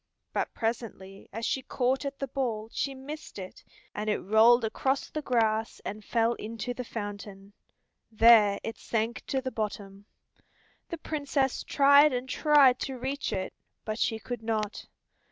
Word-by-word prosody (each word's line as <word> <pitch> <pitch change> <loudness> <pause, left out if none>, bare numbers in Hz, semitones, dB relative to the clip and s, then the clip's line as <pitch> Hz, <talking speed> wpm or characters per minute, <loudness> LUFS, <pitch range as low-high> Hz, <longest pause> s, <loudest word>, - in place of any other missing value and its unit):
But - - -1
presently 220 -4 -4
as 225 +2 -4
she 265 - 0
caught 260 +2 -1
at 275 0 -4
the 275 - -3
ball 235 -5 -3
she 275 -1 -2
missed 295 +2 -9
it, 185 -2 -9 0.3
and 210 +1 -3
it 210 - +2
rolled 225 +4 +5
across 265 +5 -1
the 305 - -3
grass 225 -4 0
and 210 +1 -5
fell 230 +2 +1
into 230 +2 -5
the 250 - -5
fountain. 205 -3 -7 0.6
There 220 -2 +6
it 225 - -5
sank 225 0 -2
to 265 - -1
the 260 0 -4
bottom. 200 -3 -5 0.8
The 335 - -4
Princess 285 -4 -1
tried 285 +1 +6
and 250 +1 -2
tried 275 -2 +5
to 265 -2 -4
reach 270 +3 -3
it, 185 0 -3 0.3
but 215 +1 -3
she 225 - +1
could 230 +2 -6
not. 220 -2 -3
230 Hz, 155 wpm, -28 LUFS, 215-265 Hz, 0.8 s, There